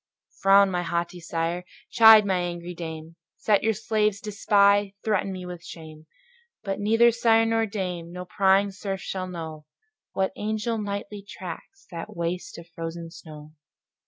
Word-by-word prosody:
Frown, 195 Hz, 0 st, +6 dB
my 180 Hz, -1 st, -1 dB
haughty 170 Hz, +1 st, -3 dB
sire! 170 Hz, +1 st, -3 dB, 0.3 s
chide, 220 Hz, -2 st, +8 dB
my 190 Hz, -2 st, +1 dB
angry 175 Hz, 0 st, -4 dB
dame! 160 Hz, -1 st, -8 dB, 0.2 s
Set 210 Hz, -2 st, +2 dB
your 220 Hz, 0 st, +1 dB
slaves 215 Hz, -2 st, 0 dB
to 210 Hz, -, -6 dB
spy; 200 Hz, -1 st, +3 dB
threaten 205 Hz, -3 st, 0 dB
me 185 Hz, -1 st, -6 dB
with 175 Hz, -1 st, -8 dB
shame: 160 Hz, -2 st, -11 dB, 0.6 s
But 195 Hz, -1 st, -3 dB
neither 225 Hz, +3 st, +4 dB
sire 225 Hz, -1 st, +3 dB
nor 225 Hz, 0 st, +1 dB
dame, 180 Hz, -5 st, -4 dB
nor 180 Hz, +1 st, -7 dB
prying 195 Hz, +1 st, +3 dB
serf 195 Hz, 0 st, -5 dB
shall 185 Hz, -1 st, -4 dB
know, 160 Hz, -4 st, -8 dB, 0.5 s
What 190 Hz, 0 st, 0 dB
angel 220 Hz, +2 st, -2 dB
nightly 205 Hz, 0 st, -5 dB
tracks 195 Hz, -, -10 dB
that 175 Hz, +5 st, -7 dB
waste 170 Hz, +1 st, -4 dB
of 170 Hz, 0 st, -11 dB
frozen 165 Hz, 0 st, -7 dB
snow. 155 Hz, -3 st, -12 dB
190 Hz, 155 wpm, -25 LUFS, 170-210 Hz, 0.6 s, chide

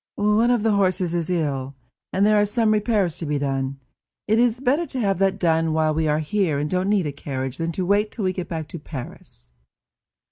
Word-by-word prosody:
"One 210 Hz, +3 st, +3 dB
of 240 Hz, -3 st, +2 dB
the 225 Hz, -, +3 dB
horses 185 Hz, -3 st, +1 dB
is 170 Hz, -1 st, -1 dB
ill, 140 Hz, -6 st, -1 dB, 0.4 s
and 195 Hz, +2 st, +2 dB
there 210 Hz, 0 st, +5 dB
are -, -, +3 dB
some 220 Hz, +1 st, +2 dB
repairs 210 Hz, -5 st, +1 dB
to 165 Hz, -, -4 dB
be 150 Hz, 0 st, 0 dB
done. 135 Hz, -1 st, -2 dB, 0.5 s
It 220 Hz, +1 st, +3 dB
is 240 Hz, 0 st, +2 dB
better 280 Hz, +6 st, +1 dB
to 260 Hz, -, -4 dB
have 195 Hz, -5 st, +1 dB
that 195 Hz, -1 st, +2 dB
done 165 Hz, -2 st, +2 dB
while 155 Hz, -1 st, +2 dB
we 160 Hz, 0 st, 0 dB
are 150 Hz, 0 st, +2 dB
here, 155 Hz, 0 st, 0 dB
and 145 Hz, +1 st, -1 dB
don't 185 Hz, +4 st, 0 dB
need 205 Hz, -4 st, +2 dB
a 145 Hz, -, -2 dB
carriage, 135 Hz, -2 st, -5 dB
than 165 Hz, 0 st, -1 dB
to 185 Hz, -, -2 dB
wait 205 Hz, +3 st, +2 dB
till 220 Hz, -, -5 dB
we 185 Hz, -1 st, +1 dB
get 180 Hz, -1 st, -5 dB
back 160 Hz, -3 st, -4 dB
to 170 Hz, -, -7 dB
Paris." 120 Hz, -, -8 dB
180 Hz, 225 wpm, -23 LUFS, 150-210 Hz, 0.5 s, there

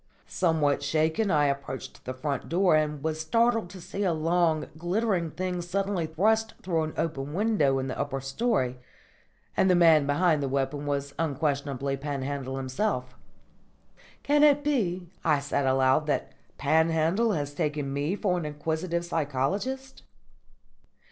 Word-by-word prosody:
_" -, -, -43 dB, 0.2 s
Somewhat 160 Hz, -6 st, +1 dB
shaken 160 Hz, +8 st, +1 dB
I 150 Hz, -4 st, +3 dB
approached 140 Hz, -2 st, -4 dB
the 130 Hz, -, -3 dB
front 140 Hz, 0 st, -3 dB
door 180 Hz, 0 st, +3 dB
and 150 Hz, -2 st, 0 dB
was 160 Hz, 0 st, -1 dB
startled 230 Hz, +2 st, +2 dB
to 185 Hz, +1 st, -10 dB
see 185 Hz, +3 st, -6 dB
a 180 Hz, -3 st, +2 dB
long, 160 Hz, -1 st, +1 dB
glittering 175 Hz, +1 st, 0 dB
thing 180 Hz, +2 st, -3 dB
suddenly 190 Hz, -1 st, -1 dB
thrust 220 Hz, +7 st, +1 dB
through 165 Hz, -4 st, 0 dB
an 155 Hz, -, -6 dB
open 145 Hz, -2 st, -3 dB
window 195 Hz, -10 st, +2 dB
in 130 Hz, -, -1 dB
the 130 Hz, -, -5 dB
upper 135 Hz, -1 st, -2 dB
storey; 135 Hz, -, -1 dB, 0.8 s
and 190 Hz, -, +3 dB
the 180 Hz, -, +5 dB
man 160 Hz, -4 st, +5 dB
behind 155 Hz, +1 st, +2 dB
the 135 Hz, -, -1 dB
weapon 140 Hz, +2 st, -2 dB
was 140 Hz, -1 st, -2 dB
unquestionably 140 Hz, -3 st, -1 dB
Panhandle 135 Hz, -1 st, -4 dB
himself. 130 Hz, -1 st, -2 dB, 1.1 s
"Can 295 Hz, +1 st, +3 dB
it 290 Hz, -1 st, +5 dB
be," 185 Hz, -, -1 dB
I 155 Hz, -3 st, +3 dB
said 140 Hz, -1 st, -1 dB
aloud, 130 Hz, +3 st, +3 dB
"that 145 Hz, -, -1 dB, 0.3 s
Panhandle 160 Hz, +8 st, +2 dB
has 145 Hz, -4 st, -3 dB
taken 145 Hz, -1 st, -2 dB
me 145 Hz, +7 st, -1 dB
for 185 Hz, -4 st, 0 dB
an 165 Hz, -, -5 dB
inquisitive 160 Hz, +3 st, -2 dB
psychologist?" 180 Hz, -, -2 dB
155 Hz, 150 wpm, -27 LUFS, 140-185 Hz, 1.1 s, the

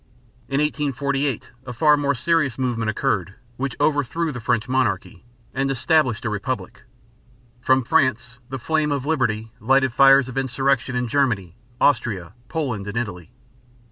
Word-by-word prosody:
In 135 Hz, +1 st, 0 dB
1848 140 Hz, -3 st, -1 dB, 0.2 s
a 125 Hz, -, -5 dB
far 150 Hz, +5 st, +4 dB
more 140 Hz, -1 st, 0 dB
serious 145 Hz, -2 st, +1 dB
movement 120 Hz, -4 st, -1 dB
occurred, 100 Hz, -3 st, -1 dB, 0.2 s
which 135 Hz, -1 st, -3 dB
overthrew 145 Hz, +3 st, +1 dB
the 125 Hz, -, -6 dB
French 115 Hz, 0 st, 0 dB
monarchy 110 Hz, -8 st, -1 dB, 0.3 s
and 135 Hz, +1 st, 0 dB
established 130 Hz, -3 st, +1 dB
a -, -, +1 dB
republic. 125 Hz, +5 st, -4 dB, 0.8 s
From 130 Hz, +1 st, +3 dB
France 125 Hz, -4 st, +1 dB
the 135 Hz, -, -4 dB
flame 155 Hz, +3 st, 0 dB
of 140 Hz, -2 st, -1 dB
liberty 115 Hz, -8 st, 0 dB
lighted 130 Hz, +2 st, +2 dB
fires 135 Hz, 0 st, +6 dB
of 130 Hz, +1 st, -3 dB
insurrection 135 Hz, -1 st, 0 dB
in 125 Hz, 0 st, 0 dB
Germany, 110 Hz, -9 st, 0 dB, 0.2 s
Austria, 110 Hz, -10 st, +1 dB, 0.2 s
Poland, 125 Hz, -11 st, -3 dB
and 100 Hz, +3 st, -4 dB
Italy. 90 Hz, -8 st, -4 dB
130 Hz, 140 wpm, -22 LUFS, 115-140 Hz, 0.8 s, fires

